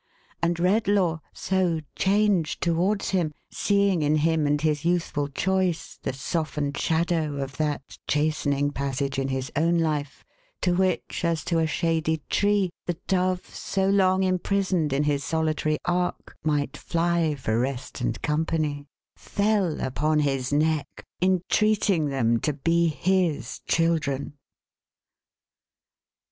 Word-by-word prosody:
And 170 Hz, 0 st, +1 dB
Redlaw 185 Hz, -2 st, +2 dB
so 185 Hz, -3 st, 0 dB, 0.2 s
changed 195 Hz, -5 st, +2 dB
towards 180 Hz, +5 st, +1 dB
him, 170 Hz, -6 st, 0 dB, 0.2 s
seeing 200 Hz, -4 st, +2 dB
in 150 Hz, +1 st, +2 dB
him 155 Hz, 0 st, +2 dB
and 145 Hz, 0 st, +2 dB
his 150 Hz, -1 st, 0 dB
youthful 170 Hz, -4 st, 0 dB
choice, 185 Hz, +3 st, -1 dB
the -, -, -2 dB
softened 145 Hz, +1 st, -2 dB
shadow 160 Hz, -2 st, 0 dB
of 135 Hz, -1 st, -5 dB
that 150 Hz, -2 st, -3 dB
chastening 145 Hz, -1 st, +1 dB
passage 140 Hz, 0 st, -2 dB
in 135 Hz, -, -1 dB
his 130 Hz, +1 st, -3 dB
own 165 Hz, +3 st, +2 dB
life, 150 Hz, -3 st, -2 dB, 0.4 s
to 180 Hz, -, +2 dB
which, 185 Hz, 0 st, 0 dB
as 165 Hz, -3 st, 0 dB
to 170 Hz, -2 st, 0 dB
a 160 Hz, -, +2 dB
shady 160 Hz, -1 st, 0 dB
tree, 205 Hz, -3 st, +2 dB, 0.2 s
the 175 Hz, -2 st, -1 dB
dove 185 Hz, -1 st, 0 dB
so 190 Hz, 0 st, -1 dB
long 190 Hz, -1 st, +3 dB
imprisoned 185 Hz, -3 st, +1 dB
in 140 Hz, +2 st, +1 dB
his 145 Hz, -1 st, 0 dB
solitary 155 Hz, 0 st, 0 dB
ark 180 Hz, 0 st, -1 dB
might 150 Hz, -2 st, 0 dB
fly 170 Hz, -2 st, 0 dB
for 115 Hz, -5 st, -1 dB
rest 130 Hz, +1 st, -3 dB
and -, -, -2 dB
company, 150 Hz, -1 st, -1 dB, 0.3 s
fell 200 Hz, -5 st, 0 dB
upon 150 Hz, +4 st, 0 dB
his 135 Hz, -3 st, 0 dB
neck, 155 Hz, 0 st, 0 dB, 0.2 s
entreating 190 Hz, -1 st, +2 dB
them 120 Hz, -4 st, +1 dB
to 150 Hz, -, -1 dB
be 170 Hz, +4 st, +2 dB
his 165 Hz, -6 st, 0 dB
children. 155 Hz, -5 st, 0 dB
160 Hz, 130 wpm, -25 LUFS, 145-180 Hz, 0.4 s, long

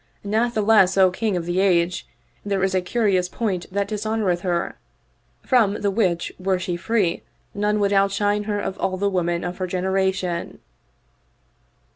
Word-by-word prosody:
Natheless, 215 Hz, -3 st, +3 dB
O 190 Hz, -1 st, +5 dB
King 205 Hz, 0 st, -1 dB
of 170 Hz, -, -4 dB
the 175 Hz, +2 st, -1 dB
Age, 180 Hz, -2 st, +1 dB, 0.4 s
there 200 Hz, -2 st, -1 dB
is 190 Hz, -1 st, +1 dB
a 185 Hz, -, +2 dB
curious 185 Hz, -2 st, +1 dB
point 190 Hz, -6 st, -3 dB
that 200 Hz, +1 st, -1 dB
dishonoreth 210 Hz, -4 st, -1 dB
her, 175 Hz, -2 st, -2 dB, 0.7 s
from 220 Hz, -6 st, +3 dB
the 200 Hz, -, +1 dB
which 185 Hz, -5 st, 0 dB
were 190 Hz, 0 st, 0 dB
she 180 Hz, -1 st, -3 dB
free 180 Hz, -1 st, 0 dB, 0.3 s
none 210 Hz, +1 st, 0 dB
would 200 Hz, 0 st, +1 dB
outshine 205 Hz, +1 st, +1 dB
her 205 Hz, -1 st, -1 dB
of 195 Hz, -1 st, -4 dB
all 185 Hz, -1 st, -1 dB
the 200 Hz, +1 st, 0 dB
women 175 Hz, -2 st, -1 dB
of 175 Hz, 0 st, -4 dB
her 185 Hz, -, -2 dB
generation." 185 Hz, -1 st, -1 dB
195 Hz, 155 wpm, -22 LUFS, 180-205 Hz, 0.7 s, O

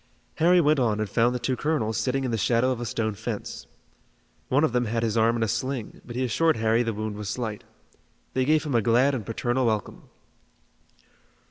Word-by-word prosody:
Harry 175 Hz, +3 st, +5 dB
went 150 Hz, -2 st, +3 dB
on 110 Hz, -4 st, +1 dB
and 110 Hz, -, -1 dB
found 120 Hz, +3 st, +2 dB
the -, -, -2 dB
two 125 Hz, +2 st, -1 dB
colonels 125 Hz, -6 st, -1 dB
sitting 135 Hz, +5 st, 0 dB
in 130 Hz, -, -1 dB
the -, -, 0 dB
shadow 120 Hz, +4 st, +2 dB
of 120 Hz, -2 st, -3 dB
a 120 Hz, -, -3 dB
stone 110 Hz, -3 st, -1 dB
fence. 105 Hz, -, -6 dB, 0.8 s
One 140 Hz, +4 st, +3 dB
of 155 Hz, -, +1 dB
them 125 Hz, 0 st, +1 dB
had 115 Hz, +1 st, -1 dB
his 110 Hz, -1 st, 0 dB
arm 115 Hz, +1 st, +3 dB
in 115 Hz, -, 0 dB
a -, -, +1 dB
sling, 130 Hz, +1 st, -3 dB
but 120 Hz, -, -9 dB
he 130 Hz, -, 0 dB
assured 160 Hz, +7 st, +2 dB
Harry 110 Hz, +1 st, +2 dB
the 115 Hz, -1 st, -1 dB
wound 110 Hz, 0 st, -4 dB
was 105 Hz, -1 st, -5 dB
slight. 110 Hz, -2 st, -4 dB, 0.7 s
They 130 Hz, -, +1 dB
gave 155 Hz, +2 st, +2 dB
him 150 Hz, -, -3 dB
a 115 Hz, -, +3 dB
glad 120 Hz, +6 st, +3 dB
and 125 Hz, -5 st, -3 dB
paternal 120 Hz, +4 st, -1 dB
welcome. 110 Hz, -3 st, -3 dB
120 Hz, 215 wpm, -25 LUFS, 110-130 Hz, 0.8 s, Harry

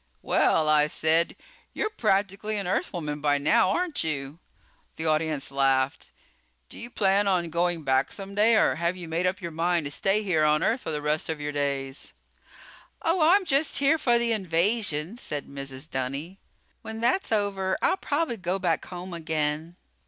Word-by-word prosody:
"Well," 155 Hz, -1 st, +2 dB
I 150 Hz, -1 st, +4 dB
said, 160 Hz, +2 st, +2 dB, 0.4 s
"you're 430 Hz, -, -2 dB
practically 210 Hz, -, 0 dB
an 200 Hz, -, -3 dB
Earthwoman 150 Hz, -4 st, -2 dB
by 145 Hz, -1 st, +3 dB
now, 150 Hz, +5 st, +3 dB
aren't 350 Hz, -, -1 dB
you?" 145 Hz, -1 st, -4 dB, 0.6 s
The 160 Hz, -, -4 dB
audience 155 Hz, -3 st, 0 dB
laughed. 135 Hz, -1 st, +1 dB, 0.6 s
"Do -, -, -10 dB
you 235 Hz, -, -8 dB
plan 200 Hz, -2 st, +2 dB
on 175 Hz, -4 st, +1 dB
going 170 Hz, -1 st, 0 dB
back 135 Hz, 0 st, +1 dB
someday 205 Hz, +3 st, +1 dB
or 130 Hz, -, +3 dB
have 170 Hz, +2 st, 0 dB
you 175 Hz, -2 st, -7 dB
made 165 Hz, +3 st, 0 dB
up 185 Hz, +3 st, -2 dB
your 170 Hz, -, -4 dB
mind 170 Hz, 0 st, 0 dB
to 145 Hz, -, -4 dB
stay 195 Hz, +7 st, +1 dB
here 170 Hz, -6 st, +1 dB
on 150 Hz, +1 st, +3 dB
Earth 245 Hz, +3 st, +1 dB
for -, -, -6 dB
the 150 Hz, -2 st, -3 dB
rest 150 Hz, +2 st, 0 dB
of 160 Hz, -2 st, -3 dB
your 150 Hz, 0 st, -3 dB
days?" 140 Hz, -1 st, -3 dB, 0.9 s
"Oh, 335 Hz, +1 st, +1 dB
I'm 400 Hz, -2 st, +1 dB
just 290 Hz, -1 st, +1 dB
here 285 Hz, +3 st, +3 dB
for 240 Hz, -5 st, +3 dB
the 235 Hz, 0 st, 0 dB
invasion," 190 Hz, -1 st, 0 dB
said 150 Hz, -, -4 dB
Mrs. 140 Hz, 0 st, -7 dB
Dunny. 140 Hz, +8 st, -4 dB, 0.4 s
"When 220 Hz, 0 st, -7 dB
that's 245 Hz, +10 st, +1 dB
over 195 Hz, -3 st, 0 dB
I'll 380 Hz, -, +3 dB
probably 290 Hz, -8 st, -1 dB
go 180 Hz, 0 st, -1 dB
back 175 Hz, -4 st, -1 dB
home 180 Hz, 0 st, -8 dB
again." 160 Hz, 0 st, -2 dB
170 Hz, 175 wpm, -26 LUFS, 150-205 Hz, 0.9 s, I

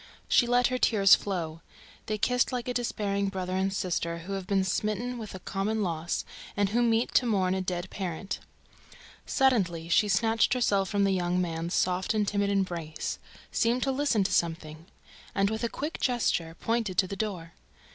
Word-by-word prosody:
She 240 Hz, -, +4 dB
let 245 Hz, +1 st, +3 dB
her 255 Hz, 0 st, -1 dB
tears 200 Hz, -6 st, +5 dB
flow. 165 Hz, -5 st, 0 dB, 0.5 s
They 215 Hz, -1 st, -1 dB
kissed 250 Hz, +5 st, +2 dB
like 245 Hz, -2 st, -3 dB
a 250 Hz, -, -1 dB
despairing 200 Hz, -5 st, -1 dB
brother 185 Hz, -1 st, -3 dB
and 190 Hz, +1 st, +1 dB
sister 170 Hz, -3 st, -2 dB
who 200 Hz, -, -4 dB
have 195 Hz, -2 st, -4 dB
been 195 Hz, -1 st, +2 dB
smitten 215 Hz, +6 st, -1 dB
with 215 Hz, -4 st, -7 dB
a -, -, -7 dB
common 205 Hz, +4 st, -1 dB
loss 165 Hz, -2 st, -2 dB, 0.3 s
and 205 Hz, -1 st, +2 dB
who 235 Hz, +4 st, +1 dB
meet 230 Hz, 0 st, +2 dB
to 250 Hz, -, +4 dB
mourn 190 Hz, -4 st, +2 dB
a 190 Hz, -, -1 dB
dead 180 Hz, 0 st, -3 dB
parent. 190 Hz, +1 st, -4 dB, 0.9 s
Suddenly, 185 Hz, -, +1 dB
she 210 Hz, +5 st, +4 dB
snatched 225 Hz, +5 st, +2 dB
herself 200 Hz, -6 st, +2 dB
from 205 Hz, -2 st, +1 dB
the 195 Hz, -, +3 dB
young 180 Hz, -1 st, 0 dB
man's 170 Hz, -1 st, -2 dB
soft 185 Hz, +3 st, +1 dB
and 210 Hz, -1 st, +1 dB
timid 200 Hz, 0 st, +1 dB
embrace, 175 Hz, -6 st, -2 dB, 0.3 s
seemed 240 Hz, +2 st, +1 dB
to 270 Hz, -, +1 dB
listen 265 Hz, -6 st, +2 dB
to 190 Hz, -, -1 dB
something, 165 Hz, -1 st, -1 dB, 0.5 s
and, 195 Hz, +1 st, +2 dB
with 220 Hz, +2 st, -3 dB
a 235 Hz, -, +1 dB
quick 300 Hz, +7 st, -4 dB
gesture, 175 Hz, -10 st, 0 dB
pointed 225 Hz, -5 st, -1 dB
to 190 Hz, -, +5 dB
the 200 Hz, -, -5 dB
door. 185 Hz, -6 st, -4 dB
195 Hz, 185 wpm, -28 LUFS, 180-225 Hz, 0.9 s, tears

